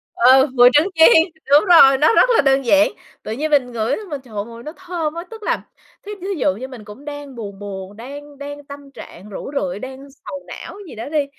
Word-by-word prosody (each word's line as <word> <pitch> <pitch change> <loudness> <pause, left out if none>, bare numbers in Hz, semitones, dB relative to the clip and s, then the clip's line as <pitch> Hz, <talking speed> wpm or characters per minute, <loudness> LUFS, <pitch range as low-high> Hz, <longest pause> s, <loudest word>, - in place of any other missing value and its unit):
Ừ, 260 +3 +5
mùi 245 -1 +7
trứng 305 +6 +4
chiên, 320 0 +7 0.3
đúng 290 +1 +7
rồi, 275 -7 +7
nó 305 +9 +3
rất - - +5
là - - +5
đơn 270 -1 +2
giản. 295 +5 +4 0.3
Tự - - -6
nhiên 300 +7 -3
mình 260 -4 +2
ngửi 235 +3 -1 0.2
mà, 290 - -2
trời, 240 -4 -16
mùi 230 0 -12
nó 305 - -7
thơm 345 -4 -4
á. 335 +1 -6
Tức 445 -1 -10
là, - - -1 0.4
thí 415 - -7
thí 375 - -6
dụ 190 -9 +1
như 255 +6 -7
mình 255 -5 -11
cũng 210 +7 -13
đang 290 -2 -8
buồn 200 -4 -8
buồn, 200 0 -8
đang 285 +4 -10
đang 285 +1 -8
tâm 280 0 -12
trạng 200 -6 -12
rũ 210 - -7
rượi, 185 -2 -4
đang 265 +3 -9
sầu 200 -9 -10
não - - -9
gì - - -11
đó 225 +5 -7
đi, 300 -2 0
270 Hz, 230 wpm, -19 LUFS, 230-295 Hz, 0.4 s, mùi